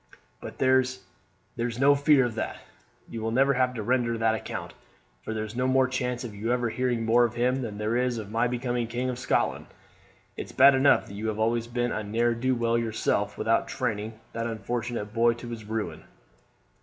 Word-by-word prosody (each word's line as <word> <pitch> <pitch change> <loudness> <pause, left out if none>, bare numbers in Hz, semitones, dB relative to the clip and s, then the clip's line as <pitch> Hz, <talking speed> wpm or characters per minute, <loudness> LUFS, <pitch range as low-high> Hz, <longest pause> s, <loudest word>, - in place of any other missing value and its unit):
But - - -8
there 130 0 +4 0.7
there's 120 0 -2
no 140 +2 +5
fear 140 -2 +4
of 120 - -3
that. 110 - -3 0.5
You 115 - -6
will 110 - -1
never 135 +4 +3
have 125 -1 +1
to 110 - -4
render 120 0 +1
that 115 0 +2
account, 110 - -5 0.5
for - - -6
there's 110 0 -4
no 125 +1 0
more 130 0 +3
chance 125 -1 -2
of 115 -4 -6
your 110 +3 -3
ever 120 -1 0
hearing 125 -2 -1
more 120 +2 +5
of 120 -1 0
him 125 +2 +1
than 110 -4 -5
there 105 +2 -1
is 125 -1 +1
of 105 -2 -7
my 115 +2 +2
becoming 120 -1 -2
king 125 +2 -2
of 125 - -6
Scotland. - - 0 0.7
It's - - -7
bad 140 +1 +7
enough 135 +1 +4
that - - -11
you 105 +2 -4
have 110 -1 -2
always 115 +1 0
been 120 0 -1
a - - -2
ne'er 115 +3 +1
do 130 +2 0
well 115 0 +1
yourself 115 -2 -1
without - - +1
training 110 +1 -3
that 115 0 -2
unfortunate 115 -1 -4
boy 115 0 +4
to 120 0 -9
his 115 -2 -7
ruin." 110 0 -4
120 Hz, 205 wpm, -27 LUFS, 110-125 Hz, 0.7 s, bad